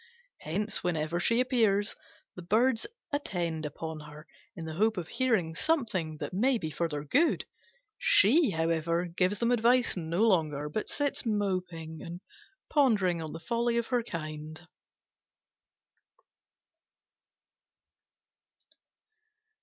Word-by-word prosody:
Hence, 205 +7 -2
whenever 165 -1 -1
she 230 +6 +2
appears, 220 -5 +2 0.4
the 180 - -8
Birds 225 - +2 0.3
attend 170 - -2
upon 160 +1 -6
her 150 0 -11 0.3
in 165 - -6
the 160 - -5
hope 215 +5 +1
of 170 -3 -3
hearing 220 -11 +1
something 190 - 0
that - - -5
may 245 +7 +2
be 160 -7 -4
for 165 +3 -1
their 145 -2 -4
good. 285 - +2 0.5
She, 275 - +5
however, 165 0 0
gives 180 +3 0
them 235 +3 +1
advice 245 +1 +3
no 170 +3 0
longer, 155 -8 +2
but 210 +8 -3
sits 285 -1 -1
moping 185 -7 -2
and 170 +1 -7 0.5
pondering 205 - +2
on 155 -1 -5
the 165 - -7
folly 235 +6 0
of 235 - -1
her 245 - +3
kind. 155 -4 -7
180 Hz, 120 wpm, -30 LUFS, 160-230 Hz, 0.5 s, She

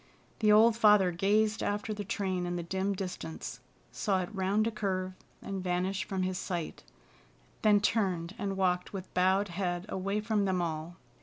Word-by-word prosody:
The 215 -1 +4
old 220 +2 +6
father 210 -5 +5
gazed 210 +5 +2
after 210 +1 -1
the 205 0 -4
train 185 -2 -2
in 175 - -2
the 175 - -3
dim 190 +3 -1
distance, 180 -8 -6 0.3
saw 190 -3 0
it 175 - -8
round 200 +2 +1
a 230 - 0
curve 185 -3 -2 0.3
and 195 -2 -4
vanish 185 +2 -1
from 190 -3 -2
his 185 0 -1
sight, 175 -3 -4 0.8
then 210 -1 +5
turned 185 -5 0
and 195 -1 -2
walked 180 -1 0
with 190 -1 -7
bowed 190 +2 +3
head 175 0 -2
away 195 +2 -1
from 210 -1 0
them 190 -2 +1
all. 165 0 -3
190 Hz, 170 wpm, -31 LUFS, 180-205 Hz, 0.8 s, old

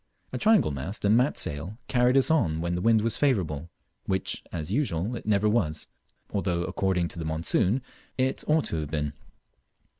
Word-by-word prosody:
A - - -2
triangle 215 - +4
mast 80 - -4
and 105 +2 +5
mat 125 +5 +2
sail 85 +6 -1
carried 125 0 +3
us 135 +4 +3
on 90 - +2
when 85 +1 -2
the 90 - -2
wind 115 +1 +4
was 115 - 0
favourable, 85 - 0 0.4
which 95 -1 -2
(as 80 +1 -4
usual) 110 - -1
it 115 - -8
never 105 0 +3
was, 85 -9 0 0.5
although, 90 -4 -1
according 90 -2 0
to - - -7
the 80 - -4
monsoon, 85 +9 +1 0.3
it 130 0 0
ought 155 0 +3
to 80 - -2
have 75 -2 -3
been. 75 -1 -2
95 Hz, 180 wpm, -27 LUFS, 80-120 Hz, 0.5 s, and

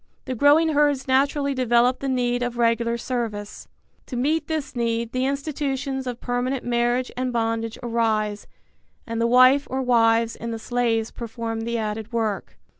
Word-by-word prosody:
The 260 - -3
growing 290 +6 +4
herds 290 -3 +2
naturally 280 +2 +2
develop 245 -1 +2
the 275 - -3
need 245 -1 0
of 245 -1 -2
regular 235 0 +1
service. 225 -4 -4 0.4
To 255 - -6
meet 300 +6 0
this 310 -5 -3
need 230 -1 -1
the 255 +1 0
institutions 275 -2 -3
of 245 -1 -4
permanent 245 +2 -2
marriage 240 +1 0
and 255 0 -2
bondage 225 -1 -1
arise 220 -3 0 0.6
and 230 0 -3
the 230 - +3
wife 255 +4 +5
or 265 +1 -2
wives 230 -2 +3
and 230 - -6
the 225 - -3
slaves 225 -1 -1
perform 230 -1 -5
the 235 0 -1
added 215 +1 -4
work. 220 -4 -2
245 Hz, 160 wpm, -23 LUFS, 230-265 Hz, 0.6 s, wife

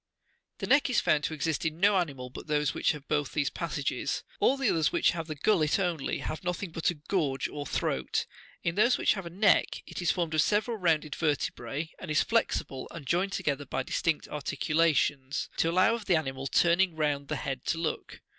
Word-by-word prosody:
The - - -4
neck 280 0 +4
is 250 - +3
found 150 -1 +2
to - - -2
exist 155 0 -1
in 160 0 -2
no 200 +2 +5
animal 140 -9 -2
but - - -9
those 150 -1 +1
which - - +2
have 150 -2 -10
both 145 -2 -1
these 145 -2 0
passages. 150 -4 -2 0.2
All 275 - +3
the 270 -2 0
others 160 -2 +2
which - - +3
have 165 -1 -5
the 155 - -4
gullet 155 -1 +2
only, 175 -7 -1
have 155 - -5
nothing 180 +1 -3
but 165 0 0
a 175 - -2
gorge 150 -3 -1
or 145 -1 -6
throat. 65 - -1 0.4
In 170 - 0
those 235 +7 +4
which - - +3
have 195 -4 -6
a - - -5
neck, 200 +4 +2
it - - -6
is 175 - +1
formed 170 -3 0
of 155 - +4
several 215 +6 +1
rounded 160 -5 +1
vertebrae, 145 0 -2
and 185 - -8
is 155 - +3
flexible, 180 - -1
and 165 -4 -9
joined 185 +7 0
together 145 -1 -1
by 130 - -2
distinct 160 +3 -1
articulations, 150 -2 0
to 165 - +2
allow 185 +6 +4
of 230 -2 -4
the 185 - +3
animal 135 -3 -2
turning 170 +4 +3
round 145 -2 -1
the - - -2
head 135 -2 -4
to - - 0
look. 165 -1 -4
160 Hz, 210 wpm, -29 LUFS, 145-180 Hz, 0.4 s, no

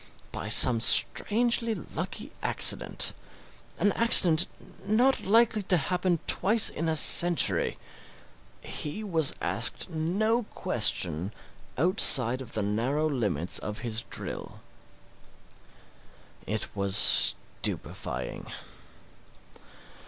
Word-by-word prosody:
By - - -8
some 120 -3 +4
strangely 230 - +2
lucky - - -8
accident - - 0 0.6
an 205 - 0
accident 180 -7 +4 0.4
not 235 +7 0
likely 225 +1 +2
to 185 -2 +1
happen 180 +3 -2
twice 215 +3 +1
in 165 +1 -5
a 160 - -2
century 175 +2 +2 0.8
he 155 +9 -7
was 165 -8 +1
asked - - -3
no 200 +9 -2
question 105 - -3 0.5
outside 130 - +6
of 130 - -11
the 110 - -3
narrow 120 +9 -2
limits 100 - +1
of 105 0 -7
his 115 -1 -2
drill. - - -9 1.9
It 110 +2 -5
was 100 0 +4 0.3
stupefying. - - -5
160 Hz, 95 wpm, -26 LUFS, -, 1.9 s, outside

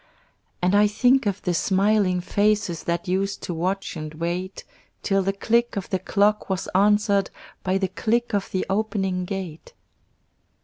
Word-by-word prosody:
And 180 +2 +3
I 205 +1 +5
think 245 +4 +3
of 200 0 -2
the 180 - 0
smiling 195 0 +2
faces 205 -2 0
That 170 +1 -2
used 195 +2 -1
to 175 - -3
watch 185 +4 -2
and 155 -1 -6
wait, 175 +4 -4 0.4
Till 195 -1 +2
the 195 +1 0
click 235 +4 +1
of 195 - -5
the 190 - +1
clock 205 +3 +1
was 190 -1 -2
answered 200 0 +3 0.3
By 190 0 0
the 195 -1 0
click 235 +5 -1
of 200 -1 -1
the 185 - -2
opening 195 -3 -1
gate. 180 -4 -6
195 Hz, 160 wpm, -24 LUFS, 185-205 Hz, 0.4 s, I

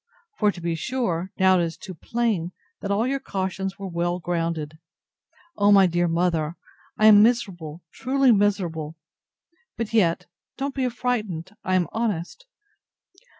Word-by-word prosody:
For 210 -1 +4
to 185 - -11
be 170 0 -2
sure, 185 -3 -2
now 190 -1 +4
it - - +2
is 165 -1 -4
too 190 - -9
plain, 190 -2 -2 0.3
that 200 - -4
all 205 +3 +1
your 275 +2 -1
cautions 190 -3 -3
were 200 -1 -6
well 175 0 -1
grounded. 165 -3 -3 0.8
O 205 0 +4
my 195 -1 +7
dear 175 0 +1
mother! 165 -1 0 0.4
I 215 - +3
am 210 -1 +9
miserable, 180 -9 0
truly 265 0 +2
miserable!—But 205 - -3
yet, 175 -7 +2 0.3
don't 275 0 -3
be 260 -2 0
frightened, 215 -8 -3
I 185 - +1
am 180 -1 +3
honest! 225 - -3
190 Hz, 145 wpm, -24 LUFS, 170-225 Hz, 0.8 s, am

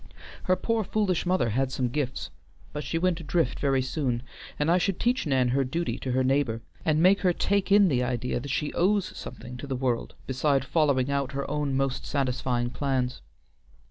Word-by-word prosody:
Her 185 - +3
poor 230 +3 0
foolish 190 -4 0
mother 180 -10 +2
had 130 +4 0
some 130 -2 0
gifts, 130 +1 -3 0.4
but 150 0 -4
she 165 - -2
went 180 0 +1
adrift 165 +1 0
very 135 -2 +2
soon, 130 -3 -1 0.3
and 150 +3 +1
I 180 - +4
should 190 0 0
teach 245 -5 +1
Nan 130 -3 +2
her 135 +3 +2
duty 165 +7 -2
to 130 - -3
her 130 +1 +2
neighbor, 130 -4 +1 0.2
and 155 0 +2
make 195 +2 +6
her 180 -2 +3
take 200 +2 0
in 200 -1 +7
the 130 -7 +1
idea 125 0 -1
that 140 +3 -7
she 145 +2 -1
owes 195 +2 +1
something 125 0 -8
to 140 - -7
the 135 - -2
world 125 -2 -1
beside 135 +1 +1
following 140 -4 +2
out 140 -1 -1
her 140 0 -3
own 145 -2 -1
most 135 -1 -1
satisfying 125 -3 -1
plans. 130 -1 -1
140 Hz, 195 wpm, -27 LUFS, 130-170 Hz, 0.4 s, in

